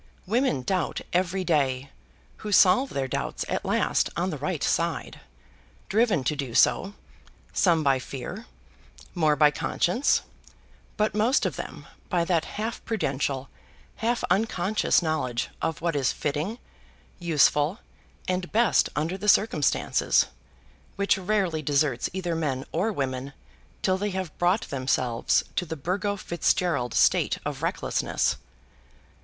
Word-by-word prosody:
Women 215 - +1
doubt 185 +1 -1
every 185 +1 +1
day, 135 -5 0 0.5
who 210 - -6
solve 205 +7 +5
their 135 -1 -2
doubts - - -3
at - - -2
last - - +1
on - - 0
the - - -4
right - - -2
side, - - -1 0.7
driven 210 - +2
to 150 - 0
do 135 -5 -4
so, 200 +2 +3 0.6
some 170 -4 +3
by 135 -2 +3
fear, 155 - -7 0.7
more 155 -4 +3
by 150 0 +5
conscience, 185 - +1 0.7
but 215 0 +1
most 225 +6 +2
of - - -1
them - - -7 0.2
by 175 -2 +1
that 170 -3 +1
half 220 +2 -5
prudential, 140 - -2 0.5
half 235 +2 0
unconscious 200 -2 +2
knowledge 130 -7 -1
of 160 -1 -2
what 170 -2 0
is 135 -3 +2
fitting, 155 +10 -2 0.6
useful, 155 0 +3 0.5
and 180 -1 -2
best 225 -4 +3
under 165 +6 -1
the 210 - 0
cirumstances, 180 - +3 0.7
which 200 0 +2
rarely 190 -4 0
deserts 140 -3 +1
either 180 -2 -2
men 140 -4 -2
or 190 +7 0
women 135 -4 -3 0.5
till 185 -1 +2
they 205 +1 -1
have 185 -4 -4
brought 180 +5 +3
themselves 130 -3 +1
to - - +1
the 160 -2 -6
Burgo 195 +7 -1
Fitzgerald 170 - 0
state - - +3
of - - -4
recklessness. - - 0
170 Hz, 130 wpm, -26 LUFS, 140-200 Hz, 0.7 s, solve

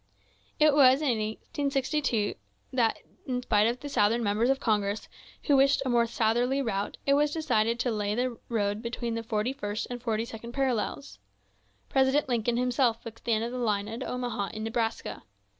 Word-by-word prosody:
It 305 -1 +6
was 265 -2 +6
in 245 -7 +1
1862 265 +1 -1 0.4
that, 235 -3 +2 0.3
in 250 -1 -2
spite 210 -2 +3
of 240 +2 -2
the 290 - -5
Southern 230 -3 +2
Members 215 +4 +1
of 270 0 +2
Congress, 210 -4 0 0.4
who 290 - +3
wished 275 0 +4
a - - 0
more 235 -1 +3
southerly 240 +4 +1
route, 205 -6 -2
it 275 - +4
was 295 +1 +3
decided 235 -7 +1
to 245 - 0
lay 210 -1 -1
the 245 -1 -2
road 205 -2 0
between 235 0 -3
the 230 - -2
forty 225 +2 -1
first 210 -4 -3
and 245 -1 -5
forty 225 -1 -1
second 235 +1 -9
parallels. 215 - -2 0.7
President 270 +2 +2
Lincoln 240 -1 0
himself 245 -2 +1
fixed 230 -1 -10
the 235 - +2
end 220 +1 +1
of 235 - -3
the 250 - -4
line 210 -4 0
at 225 +2 -6
Omaha, 245 -5 -2
in 215 - -4
Nebraska. 225 0 -2
235 Hz, 180 wpm, -28 LUFS, 220-260 Hz, 0.7 s, It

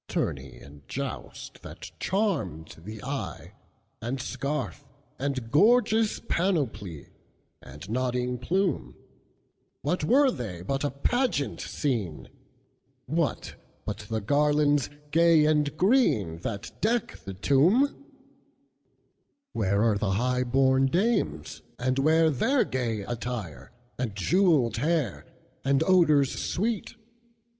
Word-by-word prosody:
Tourney - - -3
and 70 +1 -14
joust, - - -6
that - - -10
charmed 175 - -1
the 110 0 -8
eye, - - -5 0.5
And 125 +4 -3
scarf, 140 +2 -3 0.4
and 130 -4 -3
gorgeous 220 - +4
panoply, 120 - -1 0.5
And 75 +7 -11
nodding 125 +1 -1
plume, 180 +6 -1 0.9
What 155 +3 0
were 265 - +4
they 105 - -6
but 135 +8 -2
a 145 - +1
pageant 145 - -1
scene? 110 - -3 0.8
What 160 +2 -1 0.3
but - - -4
the 110 -1 -1
garlands, 145 +3 +2 0.2
gay 165 -1 +5
and 150 -1 +1
green, 175 - +2
That 100 +3 -5
deck 235 +2 0
the 95 - -8
tomb? 165 - +3 1.5
Where 100 0 +1
are 110 -3 +2
the 95 -3 0
high 125 +4 +1
born 130 +1 +3
dames, 130 - 0 0.2
and 130 +1 0
whereTheir 160 - +3
gay 115 -5 -1
attire, 120 -5 -5 0.3
and 115 -5 -2
jewelled 145 - +2
hair, 150 - -1 0.4
And 140 +2 +2
odors 155 -7 +4
sweet? 220 +3 -2
135 Hz, 105 wpm, -27 LUFS, 110-170 Hz, 1.5 s, gay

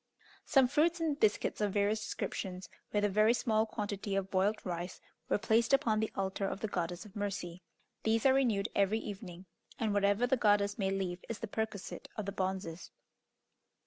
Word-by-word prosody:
Some 270 -2 +5
fruit 325 +6 +2
and 310 -3 0
biscuits 215 0 +1
of 205 -2 +1
various 205 +1 +2
descriptions, 185 -4 -4 0.2
with 205 0 +2
a - - +5
very 215 +4 +4
small 220 -2 +1
quantity 205 -2 -3
of 195 -1 -1
boiled 200 +3 +2
rice, 175 0 -4 0.3
were - - +3
placed 225 +4 +2
upon 230 -6 +3
the 220 - -1
altar 195 0 -1
of 195 - -4
the 220 - 0
Goddess 175 -1 -3
of 205 - -14
Mercy. 195 -4 -4 0.4
These 225 +2 +1
are 265 - +7
renewed 225 -7 +2
every 200 +2 +2
evening, 195 -4 -7 0.3
and 220 -3 0
whatever 205 +3 +3
the 260 +1 +2
goddess 205 -2 +3
may 190 -1 +1
leave 190 -2 -2
is 230 - -3
the 225 - -5
perquisite 215 -2 -4
of 215 - -3
the 200 - -2
bonzes. 185 -3 -3
205 Hz, 180 wpm, -33 LUFS, 190-220 Hz, 0.4 s, are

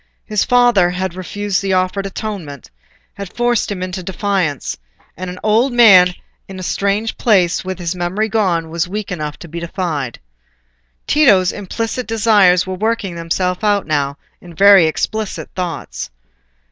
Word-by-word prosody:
His 210 -2 0
father 245 -8 +4
had 185 0 -3
refused 195 +2 -3
the 195 -1 -1
offered 185 +2 0
atonement—had 185 - -9
forced 240 -3 0
him 185 -2 -4
into 185 0 -4
defiance; 185 -5 -2 0.4
and 185 0 -6
an 180 - -7
old 230 +5 +2
man 185 -7 +7 0.3
in 195 - -9
a 185 - -7
strange 200 +4 -1
place, 185 -7 +2
with 185 0 -5
his 175 -1 -3
memory 180 +5 -1
gone, 180 -7 0
was 170 +1 -1
weak 205 +2 -5
enough 150 -4 -4
to 170 - -11
be 170 +2 -6
defied. 165 -7 -4 0.9
Tito's 205 -12 +4
implicit 225 +5 -4
desires 205 -5 +4
were 190 - -4
working 210 -1 -2
themselves 180 +3 -2
out 205 -1 +2
now 145 -2 -1 0.2
in 175 -2 -13
very 195 -1 +7
explicit 215 +6 -3
thoughts. - - -5
185 Hz, 145 wpm, -17 LUFS, 175-210 Hz, 0.9 s, man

